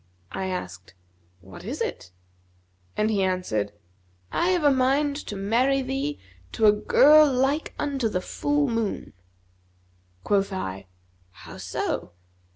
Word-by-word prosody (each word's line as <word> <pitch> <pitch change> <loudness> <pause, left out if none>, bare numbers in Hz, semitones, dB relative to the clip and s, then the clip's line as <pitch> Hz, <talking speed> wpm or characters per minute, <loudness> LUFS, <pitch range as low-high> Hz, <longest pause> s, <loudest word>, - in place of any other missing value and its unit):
I 190 - -3
asked, 90 - -6 0.5
'What 90 -1 -12
is - - -5
it?' 90 - -4 0.9
and 215 +1 +2
he 200 -2 +1
answered, 180 - -1 0.6
'I 345 - +1
have 360 -3 +1
a 290 - +6
mind 275 +2 +2
to 205 - -5
marry 245 +7 +1
thee 270 +3 -2 0.4
to 220 - +2
a 210 - +8
girl 295 +8 +6
like 270 +4 0
the 255 -9 -1
full 290 +9 0
moon.' 230 -4 -2 1.1
Quoth 200 -1 +1
I, 95 - -5 0.4
'How 90 - -12
so?' 90 - -3
225 Hz, 125 wpm, -25 LUFS, 185-275 Hz, 1.1 s, a